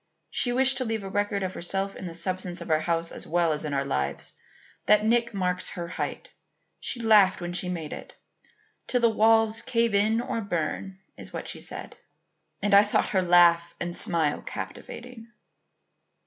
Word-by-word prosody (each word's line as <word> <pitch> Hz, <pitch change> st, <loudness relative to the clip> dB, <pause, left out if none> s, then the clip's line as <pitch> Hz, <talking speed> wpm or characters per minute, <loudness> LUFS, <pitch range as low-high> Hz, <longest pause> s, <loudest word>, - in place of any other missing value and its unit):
She 245 Hz, -, +1 dB
wished 265 Hz, +1 st, +4 dB
to 255 Hz, -, 0 dB
leave 225 Hz, -2 st, -2 dB
a 195 Hz, -, -6 dB
record 205 Hz, 0 st, 0 dB
of 185 Hz, 0 st, -3 dB
herself 195 Hz, +3 st, -3 dB
in 185 Hz, -, -7 dB
the 165 Hz, -, -7 dB
substance 180 Hz, +1 st, -2 dB
of -, -, -6 dB
our 155 Hz, -, +4 dB
house 165 Hz, +1 st, 0 dB
as -, -, -5 dB
well 170 Hz, -1 st, +2 dB
as 150 Hz, -, -4 dB
in 150 Hz, -, -3 dB
our 140 Hz, 0 st, 0 dB
lives. 70 Hz, -, -2 dB, 0.5 s
That 210 Hz, 0 st, +5 dB
nick 235 Hz, +1 st, +2 dB
marks 185 Hz, -3 st, -2 dB
her 170 Hz, -1 st, -5 dB
height. -, -, -5 dB, 0.5 s
She 245 Hz, -, -3 dB
laughed 215 Hz, -4 st, +5 dB
when 175 Hz, 0 st, -5 dB
she 180 Hz, 0 st, -1 dB
made 165 Hz, -4 st, -4 dB
it. -, -, -9 dB, 0.7 s
'Till 250 Hz, -, +1 dB
the 235 Hz, -, +5 dB
walls 225 Hz, 0 st, +3 dB
cave 230 Hz, -2 st, +1 dB
in 215 Hz, +3 st, +3 dB
or 235 Hz, -1 st, -2 dB
burn,' 190 Hz, 0 st, -3 dB, 0.2 s
is -, -, -8 dB
what -, -, -6 dB
she -, -, -6 dB
said. -, -, -7 dB, 0.7 s
And 205 Hz, -1 st, +1 dB
I 200 Hz, -, +9 dB
thought 210 Hz, 0 st, +1 dB
her 190 Hz, -, +2 dB
laugh 170 Hz, -1 st, +4 dB
and 175 Hz, 0 st, -3 dB
smile 160 Hz, -4 st, +1 dB
captivating." 240 Hz, -1 st, -8 dB
195 Hz, 185 wpm, -26 LUFS, 170-225 Hz, 0.7 s, I